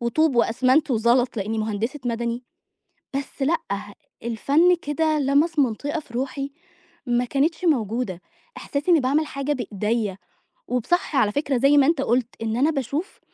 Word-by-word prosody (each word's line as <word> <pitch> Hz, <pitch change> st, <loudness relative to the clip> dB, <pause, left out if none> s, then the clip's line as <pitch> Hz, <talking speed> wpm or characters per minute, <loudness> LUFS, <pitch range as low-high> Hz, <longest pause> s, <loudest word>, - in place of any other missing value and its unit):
وطوب 250 Hz, +3 st, +1 dB
وأسمنت 255 Hz, +6 st, +3 dB
وزلط 240 Hz, +1 st, +2 dB
لإنّي 215 Hz, +2 st, -2 dB
مهندسة 220 Hz, +6 st, -2 dB
مَدني، 235 Hz, +1 st, -2 dB, 0.7 s
بس 275 Hz, +1 st, -5 dB
لأ، 310 Hz, +5 st, +2 dB, 0.7 s
الفَن 280 Hz, +10 st, +3 dB
كده 310 Hz, +1 st, 0 dB
لَمَس 290 Hz, +4 st, +2 dB
منطقة 285 Hz, +5 st, 0 dB
في 260 Hz, -, -16 dB
روحي 275 Hz, +2 st, -3 dB, 0.6 s
ما 245 Hz, 0 st, +1 dB
كانتش 315 Hz, +7 st, 0 dB
موجودة. 230 Hz, -, 0 dB, 0.4 s
إحساسي 290 Hz, +5 st, -2 dB
إنّي 330 Hz, -, +6 dB
باعمل 280 Hz, +4 st, +1 dB
حاجة 275 Hz, +1 st, -2 dB
بإيديا 215 Hz, -4 st, -2 dB, 0.5 s
وب 250 Hz, -2 st, -1 dB
صح 350 Hz, -4 st, 0 dB
على 210 Hz, -5 st, +3 dB
فكرة 280 Hz, +1 st, 0 dB
زي 275 Hz, +4 st, +4 dB
ما 275 Hz, -, +5 dB
أنت 320 Hz, -3 st, +2 dB
قُلت، 245 Hz, -1 st, +1 dB, 0.2 s
إن 225 Hz, 0 st, -1 dB
أنا 285 Hz, +5 st, +3 dB
باشوف 285 Hz, -, -3 dB
265 Hz, 150 wpm, -23 LUFS, 235-295 Hz, 0.7 s, إنّي